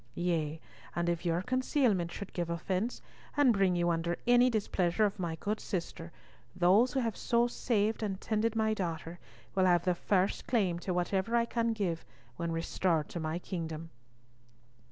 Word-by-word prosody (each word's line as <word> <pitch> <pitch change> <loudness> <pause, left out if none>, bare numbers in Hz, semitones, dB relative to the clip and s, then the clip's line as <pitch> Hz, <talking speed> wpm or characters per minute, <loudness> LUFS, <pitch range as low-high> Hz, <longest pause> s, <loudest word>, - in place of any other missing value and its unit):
Yea, 160 -3 -1 0.4
and 175 0 0
if 170 +1 -1
your 170 +2 +1
concealment 250 - +1
should 200 +2 -7
give 175 -2 -2
offence, 185 +7 -2 0.3
and 275 -5 +5
bring 195 -3 +3
you 175 0 +2
under 170 +1 -1
any 245 +1 +6
displeasure 205 -3 +1
of 205 0 -2
my 170 -3 -2
good 210 +5 -2
sister, 170 -2 -4 0.4
those 195 +8 +4
who 270 - +1
have 230 -4 -1
so 235 0 +2
saved 225 -3 0
and 195 -3 -2
tended 220 +1 0
my 220 -1 +2
daughter 170 -3 -4 0.3
will 190 -1 +3
have 175 -1 +3
the 180 - +3
first 185 +2 0
claim 190 -8 +1
to 185 - -3
whatever 190 +5 0
I 235 0 +3
can 230 -1 0
give 185 - -2 0.3
when 170 +5 -3
restored 165 -1 0
to 175 - -5
my 160 +1 -2
kingdom." 165 -3 -5
185 Hz, 170 wpm, -31 LUFS, 170-220 Hz, 0.4 s, any